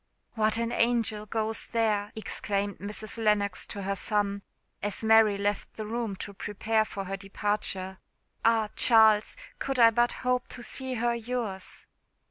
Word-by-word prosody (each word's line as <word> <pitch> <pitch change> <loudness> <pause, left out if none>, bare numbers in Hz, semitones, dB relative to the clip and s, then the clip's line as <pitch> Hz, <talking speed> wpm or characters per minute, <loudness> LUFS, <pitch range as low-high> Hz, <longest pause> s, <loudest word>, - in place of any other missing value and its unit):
"What 220 -1 +2
an 230 0 -1
angel 230 -3 +1
goes 220 +1 -2
there!" 215 -3 0
exclaimed 205 -2 -3
Mrs. 210 +3 -6
Lennox 205 -2 +1
to 200 - -6
her 195 +1 -1
son, 200 0 0 0.4
as 205 +2 -3
Mary 220 -2 +5
left 205 +1 -2
the 215 - -5
room 225 -2 -3
to 200 +2 -5
prepare 215 +2 0
for 200 -2 -5
her 195 +1 -3
departure. 195 -1 -2 0.4
"Ah! 225 -2 +3
Charles, 220 -2 +5 0.2
could 270 -1 -2
I 230 -2 +7
but 240 +1 +2
hope 250 0 +1
to 240 - -8
see 260 +1 -3
her 240 0 +1
yours!" 230 -5 -4
215 Hz, 150 wpm, -28 LUFS, 205-230 Hz, 0.4 s, I